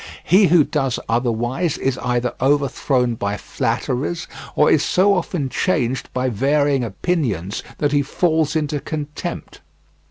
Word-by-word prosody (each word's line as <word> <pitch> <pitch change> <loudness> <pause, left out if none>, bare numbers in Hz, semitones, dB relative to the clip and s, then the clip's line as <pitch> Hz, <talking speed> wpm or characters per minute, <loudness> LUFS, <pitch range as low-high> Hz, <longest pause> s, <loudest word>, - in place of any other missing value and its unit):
He 190 +5 +5
who 165 -1 +5
does 135 -4 -1
otherwise 120 +7 0
is 130 -1 -1
either 125 0 -1
overthrown 135 -2 +1
by 105 -2 -2
flatterers, 145 +11 -2 0.3
or 150 - +4
is 150 - +4
so 200 +2 +3
often 165 -7 -1
changed 130 -4 -1
by 130 0 -1
varying 140 +3 +1
opinions 110 - -2 0.2
that 145 -1 0
he 145 -1 +3
falls 160 +1 0
into 150 -1 -1
contempt. 150 0 -6
140 Hz, 130 wpm, -20 LUFS, 125-155 Hz, 0.3 s, He